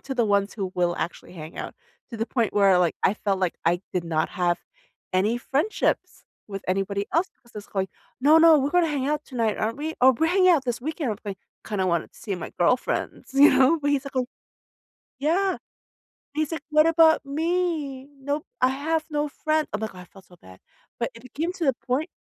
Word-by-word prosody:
to 270 - -5
the 240 - +3
ones 200 -1 +1
who 195 -4 -4
will 175 -1 +1
actually 175 - -5
hang 155 -2 -9
out, - - -6 0.4
to 230 - -6
the 225 +1 -2
point 235 -4 0
where, 200 -2 +5
like, 175 -2 +1
I 200 - +4
felt 200 -2 -1
like 185 -2 0
I 175 +1 +2
did 180 - 0
not 160 -2 -1
have 175 -1 0 0.5
any 210 +6 +2
friendships 285 - -1 0.2
with 195 -1 -6
anybody 195 +2 -1
else 350 +4 +1
'cause 235 - -23
it's 210 -1 -8
like, 190 -1 0 0.3
"No, 295 +4 +6
no. 325 -1 +7
We're 280 +1 0
gonna 355 -1 +3
hang 280 -3 -1
out 300 0 -1
tonight, 230 -5 -1
aren't 225 +3 -1
we? 310 +2 -4
Oh, 260 +1 +7
we're 320 - +3
hanging 370 +2 +4
out 320 -7 +4
this 245 -1 -2
weekend, 300 -1 -3
with 210 0 -6
me," 200 -2 -4 0.3
kinda 195 -3 -1
wanted 170 -3 0
to - - -18
see 200 - -4
my 175 - -6
girlfriends, 250 +9 0
you 285 +2 +8
know, 270 +5 +4
but 290 -1 0
he's 280 -1 +1
like, 275 -1 -8
"Oh" 255 -1 +1 0.9
Yeah, 365 +7 +1 0.8
he's 310 0 -1
like, 325 - -3
"What 305 0 +4
about 325 -2 +5
me? 310 -2 -1
Nope. 285 +3 -3
I 255 - +5
have 310 +4 -1
no 295 0 0
friend" 310 +1 0
I'm 210 - -2
like, 220 -2 -4
"Oh," - - -11
I 180 - -10
felt 190 +1 -18
so 180 - -18
bad. 95 - -16 0.4
But 235 - -1
it 230 - -13
became 310 +7 -3
to 355 - -3
the 270 - +4
point 260 +6 -2
260 Hz, 220 wpm, -25 LUFS, 200-305 Hz, 0.9 s, you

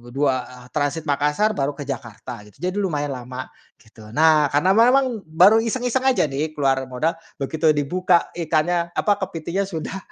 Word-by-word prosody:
2, 130 -3 -1
transit 150 +1 -1
Makassar 150 +8 +1
baru 140 +1 -1
ke 145 - -6
Jakarta 120 -2 -7
gitu. 105 - -20
Jadi 185 +2 -2
lumayan 145 -7 -1
lama. 125 +1 -7 0.3
Gitu. 110 -1 -16
Nah, 155 -1 +5
karena 150 +6 +3
memang 250 +1 +4
baru 185 +8 +5
iseng-iseng 245 +2 -1
aja 260 -9 +3
nih, 150 +3 -2
keluar 135 -2 +2
modal. 130 +6 -1 0.3
Begitu 155 +3 +2
dibuka 175 +5 +1
ikannya, 170 +1 0
apa, 205 -1 +1
kepitingnya 180 +2 -3
sudah 185 +1 -5
155 Hz, 155 wpm, -22 LUFS, 140-190 Hz, 0.3 s, Nah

